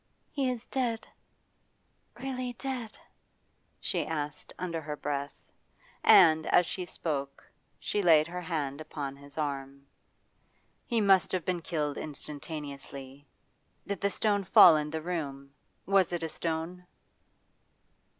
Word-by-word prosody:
'He 275 Hz, -3 st, 0 dB
is 245 Hz, -3 st, -4 dB
dead 240 Hz, -4 st, -2 dB, 1.1 s
really 255 Hz, -2 st, -3 dB
dead?' 245 Hz, -3 st, -5 dB, 0.8 s
she -, -, 0 dB
asked 150 Hz, -2 st, -4 dB
under 170 Hz, -3 st, -3 dB
her 150 Hz, -1 st, -5 dB
breath. 140 Hz, -1 st, -5 dB, 0.5 s
And, 160 Hz, -1 st, +7 dB
as 175 Hz, -, +5 dB
she 180 Hz, +2 st, -3 dB
spoke, 140 Hz, -5 st, -4 dB, 0.3 s
she 205 Hz, -, -1 dB
laid 160 Hz, -4 st, +6 dB
her 180 Hz, +2 st, -5 dB
hand 155 Hz, -4 st, -3 dB
upon 145 Hz, -3 st, -5 dB
his 140 Hz, +1 st, -13 dB
arm. 140 Hz, -2 st, -4 dB, 1.0 s
'He 235 Hz, -3 st, +1 dB
must 195 Hz, -3 st, +4 dB
have 180 Hz, -3 st, -1 dB
been 180 Hz, -2 st, -1 dB
killed 150 Hz, -4 st, -2 dB
instantaneously. 145 Hz, -2 st, -7 dB, 0.6 s
Did 200 Hz, -2 st, -4 dB
the 200 Hz, -, +2 dB
stone 205 Hz, 0 st, +1 dB
fall 175 Hz, -2 st, +8 dB
in 150 Hz, 0 st, -1 dB
the 160 Hz, 0 st, -4 dB
room? 140 Hz, -5 st, -4 dB, 0.3 s
Was 195 Hz, -2 st, +3 dB
it 175 Hz, -1 st, -2 dB
a 165 Hz, -, -2 dB
stone? 165 Hz, +3 st, -4 dB
160 Hz, 125 wpm, -30 LUFS, 145-185 Hz, 1.1 s, fall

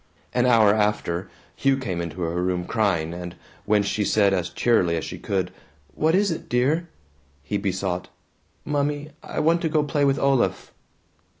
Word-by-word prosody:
An 125 Hz, 0 st, +2 dB
hour 110 Hz, -4 st, +6 dB
after, 105 Hz, -4 st, 0 dB, 0.3 s
Hugh 135 Hz, -1 st, +2 dB
came 95 Hz, -10 st, -3 dB
into 85 Hz, +1 st, -6 dB
her 85 Hz, +1 st, -1 dB
room 90 Hz, -1 st, -1 dB
crying, 90 Hz, -8 st, 0 dB
and 90 Hz, 0 st, -7 dB, 0.3 s
when 105 Hz, -1 st, +3 dB
she 105 Hz, +1 st, -1 dB
said 100 Hz, -1 st, +3 dB
as 90 Hz, -3 st, -1 dB
cheerily 90 Hz, -9 st, +2 dB
as 80 Hz, -, -3 dB
she -, -, -7 dB
could, 95 Hz, -2 st, -2 dB, 0.4 s
"What 160 Hz, +2 st, +2 dB
is 200 Hz, 0 st, +2 dB
it, 165 Hz, -, -5 dB
dear?" 145 Hz, +8 st, +1 dB, 0.5 s
he 100 Hz, +5 st, -2 dB
besought, 95 Hz, -2 st, -2 dB, 0.6 s
"Mummy, 145 Hz, 0 st, -1 dB
I -, -, -5 dB
want 165 Hz, +2 st, +3 dB
to 160 Hz, -, 0 dB
go 150 Hz, -1 st, +2 dB
play 145 Hz, 0 st, 0 dB
with 140 Hz, 0 st, +3 dB
Olaf." 135 Hz, -3 st, +1 dB
105 Hz, 170 wpm, -24 LUFS, 90-140 Hz, 0.6 s, hour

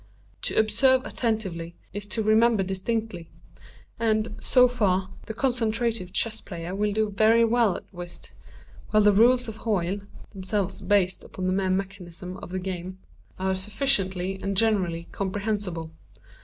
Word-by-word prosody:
To -, -, -2 dB
observe 255 Hz, +5 st, +4 dB
attentively 190 Hz, -8 st, -2 dB, 0.2 s
is 205 Hz, +1 st, -5 dB
to 220 Hz, +1 st, -1 dB
remember 220 Hz, 0 st, +4 dB
distinctly; 190 Hz, -2 st, -3 dB, 0.7 s
and, 220 Hz, -1 st, +1 dB
so 250 Hz, -1 st, +5 dB
far, 195 Hz, -6 st, 0 dB, 0.2 s
the 220 Hz, -, -4 dB
concentrative 230 Hz, -5 st, 0 dB
chess 220 Hz, +2 st, -1 dB
player 170 Hz, -1 st, -6 dB
will 210 Hz, +1 st, 0 dB
do 215 Hz, 0 st, 0 dB
very 220 Hz, +3 st, +5 dB
well 230 Hz, -4 st, +3 dB
at -, -, -14 dB
whist; 175 Hz, -1 st, -8 dB, 0.6 s
while 215 Hz, -1 st, +4 dB
the 210 Hz, 0 st, +6 dB
rules 245 Hz, +4 st, +5 dB
of 220 Hz, -1 st, -6 dB
Hoyle 200 Hz, -4 st, -1 dB, 0.3 s
(themselves 195 Hz, 0 st, -2 dB
based 190 Hz, -3 st, +2 dB
upon 185 Hz, -, -6 dB
the 185 Hz, -, +1 dB
mere 190 Hz, 0 st, 0 dB
mechanism 185 Hz, -1 st, -4 dB
of 195 Hz, -, -9 dB
the 185 Hz, -, -3 dB
game) 185 Hz, 0 st, -5 dB, 0.4 s
are 190 Hz, 0 st, 0 dB
sufficiently 190 Hz, -3 st, 0 dB
and 195 Hz, -1 st, -2 dB
generally 185 Hz, -6 st, +1 dB
comprehensible. 195 Hz, -4 st, -3 dB
200 Hz, 140 wpm, -26 LUFS, 185-220 Hz, 0.7 s, the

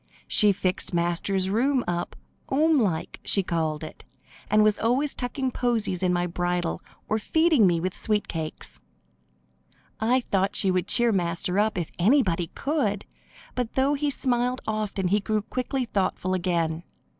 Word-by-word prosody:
She 210 Hz, -4 st, +5 dB
fixed 185 Hz, -2 st, -2 dB
Master's 175 Hz, +3 st, 0 dB
rooms 255 Hz, +4 st, +2 dB
up 175 Hz, 0 st, -3 dB, 0.3 s
"'omelike," 270 Hz, -, +1 dB
she 195 Hz, -, +2 dB
called 160 Hz, -3 st, -2 dB
it, 155 Hz, -, -9 dB, 0.5 s
and 215 Hz, 0 st, +4 dB
was 215 Hz, -1 st, +3 dB
always 260 Hz, +6 st, +1 dB
tucking 260 Hz, +1 st, -3 dB
posies 225 Hz, -7 st, 0 dB
in 185 Hz, -1 st, +2 dB
my 175 Hz, 0 st, +1 dB
bridle, 175 Hz, -1 st, -2 dB, 0.3 s
or 215 Hz, -, 0 dB
feeding 315 Hz, -, +3 dB
me 170 Hz, -2 st, +2 dB
with 185 Hz, +2 st, -2 dB
sweet 210 Hz, -1 st, 0 dB
cakes. 160 Hz, -2 st, -6 dB, 1.2 s
I 245 Hz, +4 st, +2 dB
thought 195 Hz, -4 st, 0 dB
she 190 Hz, -, +3 dB
would 185 Hz, 0 st, 0 dB
cheer 240 Hz, -1 st, +3 dB
Master 180 Hz, 0 st, 0 dB
up 215 Hz, -1 st, +1 dB
if 170 Hz, -3 st, -3 dB
anybody 185 Hz, -, +3 dB
could, 255 Hz, -9 st, -1 dB, 0.5 s
but 250 Hz, -2 st, -3 dB
though 270 Hz, +2 st, +2 dB
he 290 Hz, 0 st, 0 dB
smiled 250 Hz, -1 st, 0 dB
often 210 Hz, -4 st, -2 dB
he 205 Hz, +3 st, +3 dB
grew 215 Hz, +1 st, -1 dB
quickly 255 Hz, +3 st, -2 dB
thoughtful 185 Hz, -3 st, -1 dB
again. 170 Hz, -3 st, 0 dB
205 Hz, 150 wpm, -25 LUFS, 180-245 Hz, 1.2 s, She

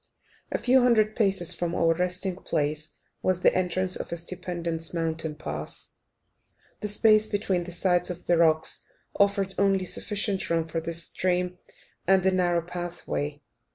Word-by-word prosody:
A -, -, +1 dB
few 260 Hz, +1 st, +4 dB
hundred 220 Hz, -3 st, +3 dB
paces 195 Hz, -5 st, +2 dB
from 170 Hz, 0 st, -2 dB
our 165 Hz, 0 st, +3 dB
resting 180 Hz, +2 st, -1 dB
place 150 Hz, -3 st, -2 dB, 0.3 s
was 185 Hz, -1 st, +1 dB
the -, -, +5 dB
entrance 185 Hz, 0 st, +1 dB
of -, -, -5 dB
a 170 Hz, -, -2 dB
stupendous 170 Hz, -1 st, -3 dB
mountain 160 Hz, -2 st, -1 dB
pass. 155 Hz, -, -5 dB, 0.9 s
The 210 Hz, -, -3 dB
space 215 Hz, +1 st, +4 dB
between 195 Hz, -4 st, -1 dB
the 180 Hz, -, -7 dB
sides 180 Hz, 0 st, +2 dB
of 180 Hz, -1 st, -6 dB
the 175 Hz, -, +3 dB
rocks 160 Hz, -1 st, +2 dB, 0.4 s
afforded 200 Hz, -1 st, +2 dB
only 195 Hz, -1 st, +2 dB
sufficient 205 Hz, +1 st, -1 dB
room 165 Hz, -1 st, 0 dB
for 165 Hz, 0 st, -3 dB
the 170 Hz, +1 st, -4 dB
stream 180 Hz, +2 st, 0 dB, 0.5 s
and 190 Hz, 0 st, +4 dB
a 190 Hz, -, +4 dB
narrow 175 Hz, -2 st, +1 dB
pathway. 170 Hz, -4 st, -5 dB
180 Hz, 155 wpm, -26 LUFS, 165-195 Hz, 0.9 s, the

